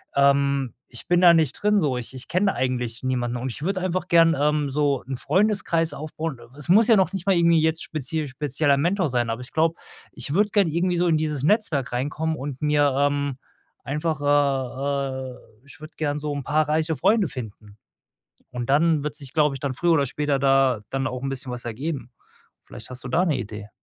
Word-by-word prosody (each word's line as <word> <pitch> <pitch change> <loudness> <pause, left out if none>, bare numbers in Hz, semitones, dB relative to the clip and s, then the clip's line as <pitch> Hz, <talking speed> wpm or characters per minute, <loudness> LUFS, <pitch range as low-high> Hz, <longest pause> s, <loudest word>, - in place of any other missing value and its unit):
ähm, 140 -2 +2 0.2
ich 120 - -9
bin 175 0 +3
da 175 -2 +8
nicht 160 -5 +2
drin 210 0 +2
so, 145 -7 0
ich 125 +1 -6
ich 130 0 -10
kenne 195 +2 +1
eigentlich 125 -2 -2
niemanden 125 -2 -1
und 130 +2 -4
ich 125 - -7
würde 190 +3 -1
einfach 185 0 -2
gern, 165 -1 +5
ähm, 150 0 +1
so 140 -1 0
’n 135 - -3
Freundeskreis 185 - +1
aufbauen 155 -1 -5
äh, 120 +3 -17
es 150 - -6
muss 210 +7 +5
ja 225 - +7
noch 185 -2 +2
nicht 190 -2 -4
mal 195 - +4
irgendwie 170 -1 +4
jetzt 160 +1 0
spezief 155 0 -3
spezieller 140 +1 +1
Mentor 175 +5 +1
sein, 120 -3 -1
aber 115 +1 -3
ich 125 - -11
glaube, 160 +1 +2 0.4
ich 140 - -5
würde 205 +4 +3
gerne 200 -5 +2
irgendwie 175 +2 0
so 175 - +2
in 165 - +3
dieses 150 -3 -1
Netzwerk 155 - +1
reinkommen 155 +5 -2
und 135 -1 -6
mir, 145 -2 +2
ähm, 140 -1 0 0.5
einfach, 150 +2 -2
äh 135 -1 0
äh - - -13 0.3
ich 145 - -15
würde 155 +1 -11
gerne 145 -1 -2
so 150 0 -3
‘n 140 -1 -4
paar 155 +3 +1
reiche 160 +1 0
Freunde 215 -3 +3
finden. 105 -4 -9 0.7
Und, 125 0 -4
dann 155 +1 +3
wird 150 0 -4
sich, 140 -4 -9
glaube 150 -2 +2
ich, 130 - -10
dann 135 -3 -3
früher 175 +5 +2
oder 145 -4 +3
später 145 +1 -1
da 135 -4 +3
dann 135 0 -1
auch 125 +2 -6
‘n 135 - -2
bisschen 135 0 -2
was 120 -1 -6
ergeben. 125 +1 -5 0.5
Vielleicht - - -7
hast 130 0 -4
du - - -5
da 165 +8 +2
’ne 155 -6 +1
Idee? 105 -2 -7
145 Hz, 215 wpm, -24 LUFS, 130-165 Hz, 0.7 s, da